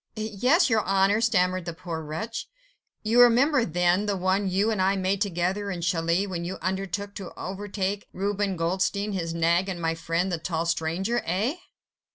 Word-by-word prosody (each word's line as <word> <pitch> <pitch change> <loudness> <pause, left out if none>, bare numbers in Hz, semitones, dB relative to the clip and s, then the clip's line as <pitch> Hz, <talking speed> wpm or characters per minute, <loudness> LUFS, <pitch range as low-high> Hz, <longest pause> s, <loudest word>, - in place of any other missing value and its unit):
"Yes, 220 - +2
your 220 -5 +2
Honour," 195 +3 +2
stammered 185 -5 +2
the 170 -1 -5
poor 170 -2 -5
wretch. 160 +10 -5 0.5
"You 230 +3 +4
remember, 250 +3 +5
then, 180 +2 +1
the 200 -1 0
one 190 +2 +1
you 200 +4 +1
and 210 -4 0
I 190 +1 +3
made 190 +1 0
together 195 +2 -1
in 175 -3 -4
Calais, 170 +3 +1
when 180 -4 -4
you 180 +2 -4
undertook 195 +2 -3
to 195 -4 -7
overtake 200 +1 -3
Reuben 200 0 -1
Goldstein, 190 +5 0
his 165 -4 -3
nag 170 +3 +2
and 180 -2 -4
my 165 -1 0
friend 165 +3 -1
the 170 - -1
tall 165 0 -2
stranger? 170 +8 -1
Eh?" 210 - -1
190 Hz, 175 wpm, -26 LUFS, 175-205 Hz, 0.5 s, remember